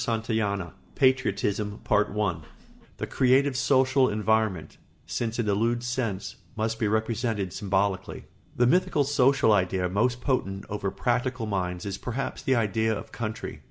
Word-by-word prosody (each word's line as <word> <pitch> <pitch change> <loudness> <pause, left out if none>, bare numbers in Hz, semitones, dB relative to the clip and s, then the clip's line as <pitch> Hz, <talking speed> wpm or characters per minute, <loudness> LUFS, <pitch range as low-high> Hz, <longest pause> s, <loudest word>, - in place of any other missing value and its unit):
CHAPTER 115 0 -1
VII 100 -5 -1 0.2
PATRIOTISM 105 -6 +1
[Sidenote: 105 -5 +1 0.5
The - - -3
creative 130 +2 +3
social 130 0 +3
environment, 110 -4 0 0.3
since 115 -1 -3
it 120 -3 -1
eludes 115 +4 +1
sense, 115 -5 -3 0.2
must 110 0 -2
be 110 - +1
represented 110 -2 -1
symbolically.] 95 -1 -1 0.3
The 120 - +3
mythical 155 +1 +3
social 135 -3 +3
idea 90 -2 +1
most 120 +6 +1
potent 100 -8 -1
over 100 -1 -2
practical 120 +4 -1
minds 90 -3 -2
is 100 -1 -4
perhaps 130 +2 -4
the 130 - +2
idea 110 -1 +1
of - - -9
country. 110 -2 -5
110 Hz, 135 wpm, -27 LUFS, 100-125 Hz, 0.5 s, creative